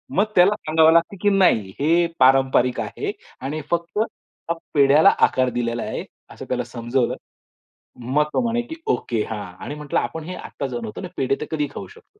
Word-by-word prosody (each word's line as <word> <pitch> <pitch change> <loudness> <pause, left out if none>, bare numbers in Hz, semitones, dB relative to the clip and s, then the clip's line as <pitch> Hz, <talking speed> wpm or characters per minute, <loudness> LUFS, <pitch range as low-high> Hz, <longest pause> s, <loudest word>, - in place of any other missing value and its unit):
मग 200 - +4
त्याला 185 +4 +6
सांगावं 160 -4 +4
लागतं, 170 +4 +2
की 205 - +4
"नाही 115 - +3
हे 170 +4 +3
पारंपरिक 130 -1 +4
आहे - - -3 0.3
आणि 145 +4 -3
फक्त 170 +4 -1
हा 195 -6 -4 0.2
पेढ्याला 145 +1 +6 0.2
आकार 130 -1 0
दिलेला 115 -1 -1
आहे." - - -4 0.3
असं - - -9
त्याला - - -1
समजवलं. 120 +1 -1 0.8
मग 130 +5 +1
तो - - +2
म्हणे, 235 0 0
की 240 +7 -8
"ओके 115 -4 0
हां." 105 -2 -4 0.2
आणि 145 - -5
म्हंटलं 150 -1 -1
"आपण 155 +7 -4
हे 180 +3 -6
आत्ता 140 - -6
बनवतो 120 - -6
ना, 180 - -5
आणि - - -21
पेढे 135 +1 +1
तर 150 - -2
कधीही 150 -2 -1
खाऊ - - -6
शकतो." 430 -1 -20
150 Hz, 185 wpm, -22 LUFS, 125-175 Hz, 0.8 s, त्याला